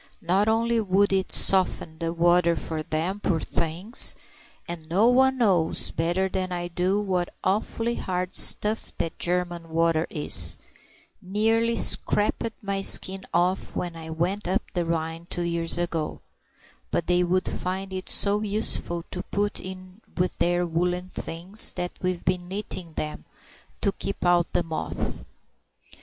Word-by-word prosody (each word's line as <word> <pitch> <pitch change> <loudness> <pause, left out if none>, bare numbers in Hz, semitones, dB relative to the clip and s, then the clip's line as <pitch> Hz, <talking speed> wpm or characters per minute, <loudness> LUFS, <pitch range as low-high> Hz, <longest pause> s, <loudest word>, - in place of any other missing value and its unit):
Not 190 +5 +1
only 230 +1 +1
would 200 0 +2
it 190 -1 0
soften 180 -4 +2
the 165 0 -2
water 170 0 +3
for 160 -1 -4
them, 160 +6 -3
poor 180 -5 0
things—and 170 -2 0
no 200 +7 +3
one 265 +2 +3
knows 185 -9 +1
better 175 +4 -1
than 185 -1 -3
I 175 0 -4
do 180 +3 0
what 185 -4 -2
awfully 225 +4 -1
hard 180 -4 -3
stuff 215 +2 +4
that 165 - -4
German 175 -1 -2
water 165 0 +1
is; 150 -2 +5 0.6
nearly 225 +4 +1
scraped 215 +2 +1
my 195 -1 -2
skin 190 0 +3
off 180 +2 0
when 175 -2 -4
I 160 -1 -9
went 175 +5 -2
up 190 +5 0
the 175 -2 -1
Rhine 165 0 -3
two 175 - -3
years 170 -1 -1
ago—but 170 0 -6
they 180 0 +2
would 185 +1 0
find 190 +1 -4
it 185 0 -6
so 205 +1 +1
useful 200 -5 +1
to 180 - -4
put 205 0 -1
in 185 +2 -10 0.2
with 180 0 0
their 175 0 +1
woollen 180 +2 -2
things 185 +5 +4
that 180 -1 -4
we've 180 -1 -3
been 180 0 -1
knitting 185 -3 -5
them, 150 0 -6 0.6
to 200 - +1
keep 195 -1 -5
out 175 -1 +2
the 175 - +1
moth." 160 -1 -5
180 Hz, 145 wpm, -25 LUFS, 170-195 Hz, 0.6 s, is